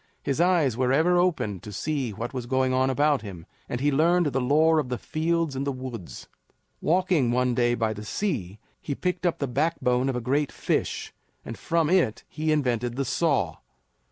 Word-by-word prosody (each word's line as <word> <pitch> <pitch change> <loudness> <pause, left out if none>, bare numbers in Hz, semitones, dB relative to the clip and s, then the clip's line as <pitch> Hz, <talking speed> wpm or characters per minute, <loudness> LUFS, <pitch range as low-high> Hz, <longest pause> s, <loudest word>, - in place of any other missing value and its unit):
His 140 +4 0
eyes 170 -9 +3
were 125 +1 +1
ever 165 +6 +3
open 155 - 0
to 105 - -10
see 135 +3 -2
what 115 +5 -5
was 125 -2 -4
going 130 0 +1
on 130 +1 +2
about 145 +2 +2
him, 90 -6 -9 0.2
and 120 - -2
he 145 +2 +2
learned 170 +5 +3
the 135 - +1
lore 155 +5 +4
of 135 -5 -2
the 125 - -2
fields 165 0 -1
and 135 - -2
the 140 - -1
woods. 120 - -8 0.5
Walking 175 -6 +2
one 125 +1 +1
day 120 0 +2
by 110 -2 0
the 105 0 -8
sea, 105 - -3 0.2
he 140 - -3
picked 180 +2 -1
up 170 - 0
the 140 - -1
backbone 130 -2 +1
of 130 - -1
a - - -1
great 140 +4 0
fish, - - -2 0.3
and - - -6
from 165 -2 0
it 165 - +2
he 155 +1 -2
invented 125 -5 0
the 135 +1 -1
saw. 130 - 0
135 Hz, 195 wpm, -26 LUFS, 120-160 Hz, 0.5 s, lore